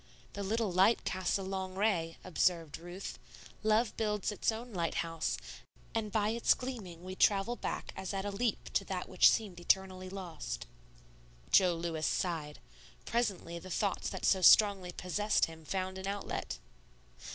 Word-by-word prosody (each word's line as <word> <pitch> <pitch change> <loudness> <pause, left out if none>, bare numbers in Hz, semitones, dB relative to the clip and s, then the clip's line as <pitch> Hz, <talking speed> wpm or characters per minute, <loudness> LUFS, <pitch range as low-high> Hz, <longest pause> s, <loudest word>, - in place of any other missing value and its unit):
"The 205 - -5
little 215 +1 0
light 190 +6 +4
casts 185 0 0
a 195 - -5
long 190 -1 -4
ray," 185 -5 +1
observed 165 -3 0
Ruth. 175 +3 -7 0.4
"Love 215 +1 +2
builds 210 -2 0
its 210 - +1
own 230 +1 -7
lighthouse, 165 -2 -1 0.6
and 220 -3 -1
by 210 -1 +2
its 230 +1 +3
gleaming 205 -10 -6
we 185 0 -6
travel 200 +4 +3
back - - -4
as 190 - -4
at 195 0 -3
a 205 - -2
leap 220 +3 -2
to - - +1
that - - -3
which - - +6
seemed 200 -6 -1
eternally 185 +1 +1
lost." 165 - -5 0.9
Jo 180 -3 +5
Lewis 165 -2 -2
sighed. 160 -5 -1 0.5
Presently 200 -7 -1
the 185 - -10
thoughts 195 +2 -1
that - - -4
so 190 - +4
strongly 195 -1 +6
possessed 205 +4 +1
him 160 -1 -12
found 190 +2 -2
an 190 - -5
outlet. 200 0 -3
190 Hz, 155 wpm, -33 LUFS, 175-210 Hz, 0.9 s, which